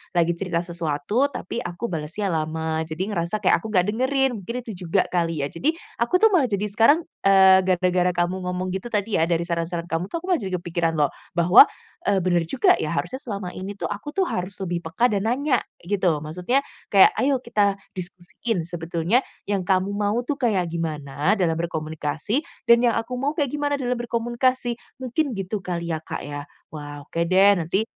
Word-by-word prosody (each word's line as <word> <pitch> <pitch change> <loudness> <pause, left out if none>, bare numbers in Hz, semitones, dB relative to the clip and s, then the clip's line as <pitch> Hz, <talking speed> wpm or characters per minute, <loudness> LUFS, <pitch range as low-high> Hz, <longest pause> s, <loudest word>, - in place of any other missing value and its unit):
lagi 170 -1 +3
cerita 175 -3 -1
sesuatu, 170 - 0
tapi 235 -4 -5
aku 230 +1 -5
balesnya 170 +5 -3
lama, 160 0 -1
jadi 160 +3 -3
ngerasa 180 +3 -2
kayak - - +4
aku 195 - -7
nggak 185 -4 +3
dengerin, 265 +4 +1
mungkin 235 +6 -6
itu 225 - -7 0.2
juga 185 +3 +3
kali 165 -4 0
ya. 140 - -3
Jadi, 305 - 0 0.2
aku 235 +9 +1
tuh 445 +3 +5
malah 315 -10 +3
jadi 200 -2 -1
sekarang, 260 +11 +4 0.2
eee, 190 -1 +7
gara-gara 180 0 +2
kamu 175 +1 +1
ngomong 180 0 -2
gitu 190 +5 -4
tadi 210 -4 0
ya, 165 - +3
dari 170 0 +1
saran-saran 170 0 -2
kamu 165 +3 -1
tuh 335 - -5
aku - - -6
malah 355 - +3
jadi 190 -4 -3
kepikiran 170 -1 -1
loh, 145 -2 +2 0.2
bahwa, 180 - +8 0.4
eee, 200 -1 +3
benar 175 -2 +2
juga 255 - +3
ya, 155 +2 -2
harusnya 260 +9 -2
selama 200 -7 -5
ini 195 +2 -6
tuh - - -4
aku 295 +7 -9
tuh 390 - +3
harus 180 +2 -2
lebih 175 -2 -2
peka 235 +10 +2
dan 200 +1 0
nanya 260 +2 +2 0.3
gitu, 180 -5 +1
maksudnya 180 - 0 0.3
kayak, 195 - +8
"Ayo 270 -1 +2
kita 205 -3 +2 0.2
diskusiin, 180 +3 -4
sebetulnya 170 +5 0 0.3
yang 200 -2 +1
kamu 190 0 +2
mau 205 0 +1
tuh 275 +3 -3
kayak 205 - +1
gimana 155 0 -1
dalam 175 -6 +1
berkomunikasi, 160 - -2 0.2
dan 235 +1 +6
yang 235 - +3
aku 240 +2 -2
mau 280 +4 -1
kayak 290 -4 0
gimana 290 0 0
dalam 250 -1 -1
berkomunikasi." 240 +1 0 0.2
Mungkin 260 +2 -1
gitu 195 +1 -3
kali 170 -2 -3
ya - - 0
Kak - - -5
ya. 145 0 -6 0.2
Wah, 145 -1 -8
oke 165 +3 -2
deh 195 +3 +5
nanti 175 +4 0
185 Hz, 190 wpm, -23 LUFS, 170-235 Hz, 0.4 s, bahwa